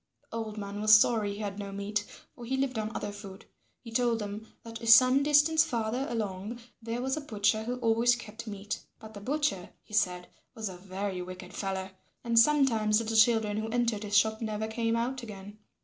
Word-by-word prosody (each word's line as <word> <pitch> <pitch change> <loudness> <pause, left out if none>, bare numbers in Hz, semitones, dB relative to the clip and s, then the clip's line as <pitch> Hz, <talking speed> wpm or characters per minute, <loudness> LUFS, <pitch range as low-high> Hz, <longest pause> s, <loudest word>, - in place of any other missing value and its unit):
The - - -4
old 220 -1 -5
man 200 0 -5
was 215 0 +8
sorry 215 -1 +3
he 200 - -8
had 205 -1 -4
no 200 -1 -5
meat, 205 +1 -2 0.3
for 240 - -12
he 260 +3 -2
lived 265 -4 -1
on 215 0 -3
other 205 - -3
food. 200 -2 -10 0.4
He 230 - -10
told 235 0 +2
them 210 +1 -6 0.2
that 230 0 -8
some 255 +4 +7
distance 300 +2 +4
farther 240 -2 -2
along 215 0 -4 0.2
there 230 +2 -3
was 265 +3 -1
a - - -3
butcher 215 -4 0
who 245 +2 -2
always 230 +1 +3
kept 230 0 -9
meat; 205 0 -5 0.2
but 220 0 -12
the 205 - -9
butcher, 275 -7 -1
he - - -18
said, 180 -4 +1 0.3
was 220 -2 -4
a 185 - -8
very 190 0 -4
wicked 180 0 -9
fellow 190 -1 -3 0.3
and 235 -1 +4
sometimes 230 -6 +4
little 225 0 -3
children 220 -2 +4
who 220 +1 -3
entered 235 -3 0
his 205 -1 +1
shop 220 +2 +2
never 215 -1 -2
came 230 +1 -1
out 250 +3 -2
again. 205 -2 -10
220 Hz, 200 wpm, -29 LUFS, 205-235 Hz, 0.4 s, was